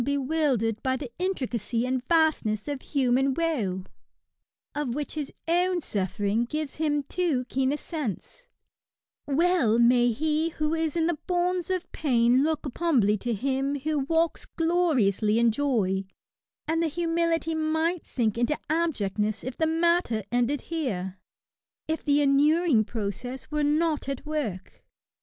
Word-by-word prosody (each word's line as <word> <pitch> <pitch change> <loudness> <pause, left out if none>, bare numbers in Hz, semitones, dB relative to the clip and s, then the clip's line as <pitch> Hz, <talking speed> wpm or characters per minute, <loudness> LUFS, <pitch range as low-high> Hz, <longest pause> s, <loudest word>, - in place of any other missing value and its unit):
bewildered 275 -5 0
by 260 0 0
the 260 -3 -7
intricacy 250 - -1
and 255 0 -1
vastness 310 -10 +2
of 285 -2 -3
human 265 -1 +1
woe^ 225 - -1 0.9
of 285 -5 -2
which 295 0 -4
his 300 -3 -4 0.2
own 355 +2 +2
suffering 205 - -1
gives 300 +3 -4
him 295 -2 0
too 295 -5 -1
keen 265 0 +1
a - - +1
sense^ 310 - -6 0.8
well 290 -6 +3
may 240 0 +5
he 310 +6 0
who 305 -1 -2
is 320 -1 -1
in 325 - +2
the 335 -3 0
bonds 360 0 0
of 370 -2 -2
pain 245 -3 +3
look 315 0 -1
up 275 - -7
humbly 255 -12 +3
to 240 +4 -3
him 270 +5 -1
who 305 +1 0
walks 325 +4 0
gloriously 265 - +2
in 235 0 +4
joy; 215 -8 0 0.6
and 325 +1 +1
the 335 - +2
humility 330 0 0
might 320 +2 0
sink 230 -3 0
into 240 +5 +1
abj^ct 310 - -1
ness 210 0 0
if 255 0 -5
the 320 - +1
matter 330 - +1
ended 245 +3 +1
here^ 200 - -2 0.7
if 320 +1 -2
the 290 0 +3
inuring 285 -2 +4
process 235 +6 -5
were 300 0 0
not 300 -1 +1
at 275 +1 -4
work. 270 -12 -4
285 Hz, 145 wpm, -27 LUFS, 235-320 Hz, 0.9 s, may